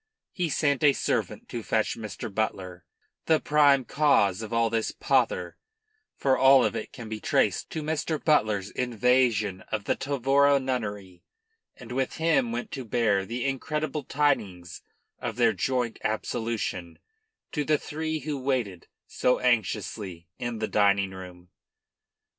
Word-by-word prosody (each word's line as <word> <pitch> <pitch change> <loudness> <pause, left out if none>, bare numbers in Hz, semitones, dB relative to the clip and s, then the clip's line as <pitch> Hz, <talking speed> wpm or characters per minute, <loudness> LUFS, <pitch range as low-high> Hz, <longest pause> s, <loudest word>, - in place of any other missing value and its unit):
He 175 -3 -2
sent 145 -2 +1
a 145 -2 +6
servant - - -2
to 120 - -4
fetch 110 0 0
Mr. 110 -2 -7
Butler, 95 -4 -3 0.4
the 160 -1 +4
prime 145 -3 +4
cause 110 -11 +2
of 110 - -7
all 115 -1 +1
this 115 -1 0
pother - - 0 0.6
for 135 -1 +2
all 135 -1 +6
of - - -1
it - - -5
can 115 -3 -9
be 110 0 -5
traced - - +1
to 160 - -4
Mr. 155 +1 -1
Butler's 105 - +1
invasion 120 -5 +1
of 110 -2 -2
the - - 0
Tavora 140 +1 +2
nunnery 105 -8 -4 0.5
and 120 -1 -12
with 130 +1 -1
him 155 -7 +2
went 120 +1 -4
to 135 - -5
bear 105 -5 +1
the 120 +2 -3
incredible 150 +2 -2
tidings 100 - -1 0.4
of - - -4
their - - +3
joint 125 -3 -1
absolution 110 -5 -3 0.5
to 150 - -1
the 150 +1 +2
three 155 +1 -4
who 145 -2 -3
waited 125 -9 -2 0.2
so 125 - +1
anxiously 105 -7 -1
in 120 -1 -3
the 110 0 -2
dining 100 -2 +2
room. 90 -1 -11
120 Hz, 145 wpm, -27 LUFS, 105-140 Hz, 0.6 s, a